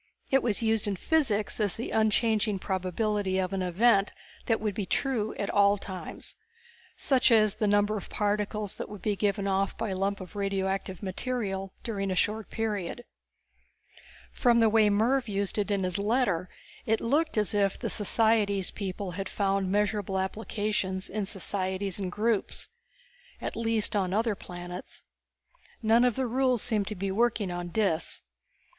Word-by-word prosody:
It 270 Hz, 0 st, +5 dB
was 230 Hz, -2 st, 0 dB
used 220 Hz, -2 st, +1 dB
in 200 Hz, -, 0 dB
physics 220 Hz, -, +1 dB
as 205 Hz, -3 st, +1 dB
the 230 Hz, -, -5 dB
unchanging 220 Hz, -1 st, +2 dB
probability 190 Hz, +1 st, -1 dB
of 190 Hz, 0 st, -1 dB
an 195 Hz, -, -1 dB
event 195 Hz, +3 st, +3 dB, 0.4 s
that 225 Hz, -2 st, +2 dB
would 210 Hz, -1 st, -1 dB
be 200 Hz, -1 st, -3 dB
true 230 Hz, -4 st, 0 dB
at 200 Hz, -, -2 dB
all 200 Hz, 0 st, +4 dB
times. 190 Hz, -2 st, -7 dB, 0.6 s
Such 265 Hz, -3 st, +3 dB
as 215 Hz, -3 st, +5 dB
the 215 Hz, -, -1 dB
numbers 205 Hz, +1 st, +3 dB
of -, -, -17 dB
particles 210 Hz, 0 st, -1 dB
that -, -, -6 dB
would 210 Hz, -2 st, -9 dB
be 210 Hz, -1 st, +1 dB
given 200 Hz, 0 st, 0 dB
off 195 Hz, 0 st, 0 dB
by 225 Hz, -1 st, -2 dB
a 190 Hz, -, -2 dB
lump 195 Hz, +1 st, -1 dB
of 185 Hz, +1 st, -10 dB
radioactive 195 Hz, -1 st, -2 dB
matter 195 Hz, -1 st, -2 dB, 0.2 s
during 200 Hz, -4 st, -2 dB
a 185 Hz, -, 0 dB
short 215 Hz, +3 st, 0 dB
period. 220 Hz, 0 st, -3 dB, 1.3 s
From 240 Hz, -2 st, +3 dB
the 225 Hz, -1 st, +5 dB
way 215 Hz, -1 st, +5 dB
Mervv 235 Hz, +5 st, +2 dB
used 200 Hz, 0 st, -1 dB
it 205 Hz, -, 0 dB
in 200 Hz, -2 st, +1 dB
his 180 Hz, 0 st, 0 dB
letter 200 Hz, -5 st, +1 dB, 0.4 s
it 220 Hz, 0 st, +2 dB
looked 300 Hz, +4 st, +1 dB
as 210 Hz, +1 st, +1 dB
if 200 Hz, -1 st, +2 dB
the -, -, -3 dB
societics 210 Hz, -2 st, +2 dB
people 195 Hz, -1 st, -4 dB
had 195 Hz, +2 st, -4 dB
found 195 Hz, -2 st, 0 dB
measurable 205 Hz, -1 st, 0 dB
applications 190 Hz, -1 st, -2 dB
in 205 Hz, -1 st, -2 dB
societies 190 Hz, 0 st, -1 dB
and 185 Hz, -2 st, -3 dB
groups. 215 Hz, +1 st, -1 dB, 0.7 s
At -, -, -4 dB
least 225 Hz, -2 st, 0 dB
on 190 Hz, -2 st, +1 dB
other 225 Hz, +1 st, +2 dB
planets. 180 Hz, -1 st, -8 dB, 0.8 s
None 225 Hz, +2 st, +5 dB
of 250 Hz, -3 st, +3 dB
the 265 Hz, -, 0 dB
rules 250 Hz, -1 st, +1 dB
seemed 210 Hz, -3 st, 0 dB
to 215 Hz, -, -4 dB
be 195 Hz, +1 st, -2 dB
working 220 Hz, -2 st, +1 dB
on 175 Hz, 0 st, -4 dB
Dis. 175 Hz, -4 st, -1 dB
205 Hz, 165 wpm, -28 LUFS, 195-220 Hz, 1.3 s, It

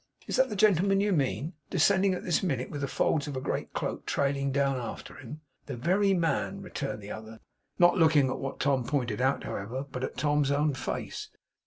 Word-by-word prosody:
Is -, -, -2 dB
that 260 Hz, 0 st, +4 dB
the 210 Hz, -, -4 dB
gentleman 195 Hz, -1 st, +4 dB
you 205 Hz, +1 st, +2 dB
mean? 140 Hz, -, 0 dB, 0.2 s
Descending 190 Hz, +2 st, +3 dB
at -, -, -6 dB
this 175 Hz, -, +1 dB
minute, 135 Hz, -9 st, -2 dB
with 145 Hz, -, -5 dB
the 140 Hz, -, -1 dB
folds 150 Hz, +2 st, +1 dB
of 140 Hz, -2 st, -4 dB
a -, -, 0 dB
great -, -, -3 dB
cloak -, -, -3 dB
trailing 140 Hz, -1 st, 0 dB
down 140 Hz, -1 st, +1 dB
after 120 Hz, -3 st, -6 dB
him?' 135 Hz, +4 st, -9 dB, 0.3 s
'The 135 Hz, -4 st, -5 dB
very 190 Hz, -, +2 dB
man!' 175 Hz, +2 st, 0 dB
returned 135 Hz, -, -5 dB
the 100 Hz, -, -7 dB
other, 110 Hz, +1 st, -8 dB, 0.4 s
not 175 Hz, +2 st, +5 dB
looking 155 Hz, -4 st, +5 dB
at -, -, -3 dB
what 135 Hz, -, -5 dB
Tom 135 Hz, -2 st, +2 dB
pointed 125 Hz, -5 st, -1 dB
out, 135 Hz, +1 st, +1 dB
however, 120 Hz, +8 st, -4 dB
but 125 Hz, 0 st, -4 dB
at -, -, -4 dB
Tom's 145 Hz, 0 st, +2 dB
own 145 Hz, +1 st, +2 dB
face. 135 Hz, -, -4 dB
140 Hz, 205 wpm, -29 LUFS, 130-175 Hz, 0.4 s, not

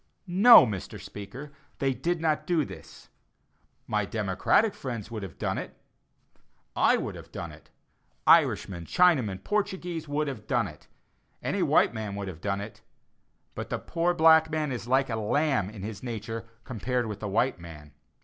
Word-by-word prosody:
No, 200 Hz, -, +8 dB
Mr. 100 Hz, -6 st, -5 dB
Speaker, 125 Hz, +8 st, -9 dB, 0.3 s
they 135 Hz, -1 st, 0 dB
did 175 Hz, +6 st, -1 dB
not 155 Hz, -1 st, 0 dB
do 165 Hz, -5 st, +2 dB
this. -, -, -12 dB, 0.8 s
My 105 Hz, -1 st, 0 dB
"democratic" 105 Hz, -, +1 dB
friends 115 Hz, -5 st, -6 dB
would 110 Hz, -2 st, -5 dB
have 95 Hz, -4 st, -8 dB
done -, -, -2 dB
it. -, -, -8 dB, 1.0 s
I -, -, +4 dB
would -, -, -4 dB
have -, -, -12 dB
done 85 Hz, -2 st, -6 dB
it. 75 Hz, +1 st, -16 dB, 0.6 s
Irishmen, 85 Hz, -3 st, +3 dB
Chinamen, 130 Hz, -, +2 dB
Portuguese, 180 Hz, -6 st, -2 dB
would 150 Hz, +1 st, -1 dB
have 120 Hz, -7 st, -6 dB
done 120 Hz, -5 st, +1 dB
it; 75 Hz, -4 st, -13 dB, 0.6 s
any -, -, -1 dB
white -, -, +3 dB
man 110 Hz, -3 st, -5 dB
would 100 Hz, -1 st, -4 dB
have 85 Hz, -3 st, -10 dB
done 100 Hz, -1 st, -2 dB
it; 105 Hz, +1 st, -9 dB, 0.7 s
but -, -, -6 dB
the -, -, -1 dB
poor 175 Hz, +1 st, -1 dB
black 160 Hz, 0 st, +6 dB
man 155 Hz, -2 st, -1 dB
is 120 Hz, -3 st, -5 dB
like 135 Hz, +2 st, +2 dB
a 110 Hz, -, -1 dB
lamb 125 Hz, -1 st, +1 dB
in 105 Hz, -3 st, -9 dB
his 105 Hz, -1 st, -6 dB
nature 115 Hz, -1 st, -5 dB, 0.2 s
compared 125 Hz, +2 st, -2 dB
with 105 Hz, -2 st, -5 dB
the 105 Hz, -, -4 dB
white 115 Hz, +1 st, +1 dB
man. 75 Hz, -4 st, -11 dB
120 Hz, 170 wpm, -27 LUFS, 100-155 Hz, 1.0 s, No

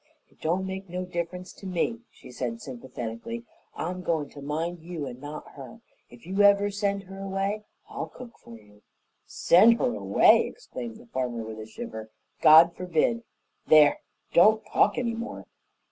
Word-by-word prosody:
"It -, -, -29 dB
don't 175 Hz, +4 st, 0 dB
make 190 Hz, 0 st, -6 dB
no 180 Hz, +1 st, -4 dB
difference 180 Hz, +1 st, -5 dB
to 195 Hz, -, -10 dB
me," 190 Hz, +6 st, -1 dB
she -, -, -15 dB
said 120 Hz, -2 st, -4 dB
sympathetically. 125 Hz, -, -7 dB, 0.3 s
"I'm 180 Hz, +2 st, -4 dB
goin' 160 Hz, -5 st, -1 dB
to 140 Hz, -, -11 dB
mind 160 Hz, +5 st, -3 dB
you 165 Hz, -3 st, -6 dB
and 125 Hz, -1 st, -8 dB
not 150 Hz, +1 st, -8 dB
her. 145 Hz, -, -11 dB, 0.3 s
If 120 Hz, +3 st, -16 dB
you 190 Hz, +3 st, 0 dB
ever 200 Hz, 0 st, +5 dB
send 200 Hz, -1 st, -1 dB
her 195 Hz, +1 st, -11 dB
away 195 Hz, +2 st, -2 dB, 0.2 s
I'll -, -, -5 dB
cook 245 Hz, -2 st, -12 dB
for 115 Hz, -1 st, -13 dB
you." 105 Hz, -1 st, -21 dB, 0.5 s
"Send 220 Hz, +7 st, +5 dB
her 245 Hz, -, 0 dB
away!" -, -, +4 dB
exclaimed 235 Hz, -, -8 dB
the 235 Hz, -, -15 dB
farmer, 125 Hz, -, -3 dB
with 110 Hz, 0 st, -8 dB
a 110 Hz, -, -8 dB
shiver. 110 Hz, 0 st, -8 dB, 0.3 s
"God 160 Hz, +2 st, +8 dB
forbid! 180 Hz, +6 st, 0 dB, 0.5 s
There, 150 Hz, -2 st, +6 dB, 0.3 s
don't 215 Hz, +5 st, +5 dB
talk -, -, +2 dB
any 235 Hz, -2 st, -1 dB
more!" 230 Hz, +1 st, -6 dB
175 Hz, 165 wpm, -27 LUFS, 135-200 Hz, 0.5 s, God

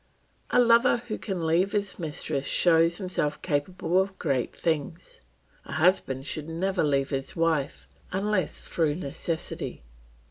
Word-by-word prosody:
A -, -, +3 dB
lover 235 Hz, 0 st, +4 dB
who 215 Hz, -, -3 dB
can 185 Hz, -5 st, -3 dB
leave 175 Hz, +5 st, +2 dB
his 205 Hz, -2 st, -1 dB
mistress 150 Hz, -3 st, -2 dB
shows 165 Hz, 0 st, +4 dB
himself 180 Hz, -6 st, -2 dB
capable 175 Hz, +3 st, +1 dB
of 190 Hz, 0 st, -4 dB
great 135 Hz, -6 st, -1 dB
things; 165 Hz, -, -3 dB, 0.4 s
a -, -, -8 dB
husband 140 Hz, -5 st, +2 dB
should 155 Hz, +1 st, -4 dB
never 185 Hz, +3 st, 0 dB
leave 140 Hz, -2 st, +1 dB
his 135 Hz, -1 st, -3 dB
wife 165 Hz, -4 st, 0 dB, 0.2 s
unless 195 Hz, 0 st, -1 dB
through 155 Hz, -3 st, +1 dB
necessity. 160 Hz, -, -4 dB
165 Hz, 135 wpm, -27 LUFS, 150-190 Hz, 0.4 s, lover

